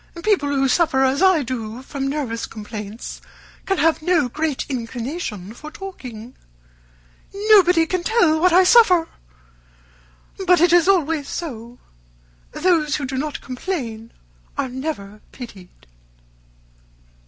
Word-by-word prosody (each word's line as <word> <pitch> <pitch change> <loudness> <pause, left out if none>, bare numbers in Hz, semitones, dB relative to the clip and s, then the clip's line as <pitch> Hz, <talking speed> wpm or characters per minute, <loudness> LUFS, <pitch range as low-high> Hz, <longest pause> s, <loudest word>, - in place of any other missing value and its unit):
People 380 -9 +2
who 275 -1 +1
suffer 265 -1 +2
as 265 +4 +1
I 375 -6 +4
do 235 -1 -5
from 270 0 -4
nervous 270 -5 -3
complaints 210 0 -8 0.5
can 390 - +1
have 325 0 +2
no 325 -4 +2
great 300 +2 -2
inclination 235 - -5
for 300 +6 -10
talking. 255 - -9 1.2
Nobody 360 -5 +6
can 365 +2 -2
tell 350 -6 +2
what 365 +2 +4
I 365 +2 +6
suffer! 365 -5 +5 1.4
But 360 0 +5
it 345 +1 +4
is 350 0 +5
always 325 -6 +1
so. 240 -7 -6 0.7
Those 315 -3 +1
who 290 - -3
do 265 0 -5
not 290 +2 -3
complain 245 -6 -5 0.5
are 260 - -1
never 250 -7 -6
pitied." 200 -8 -12
285 Hz, 120 wpm, -21 LUFS, 245-345 Hz, 1.4 s, Nobody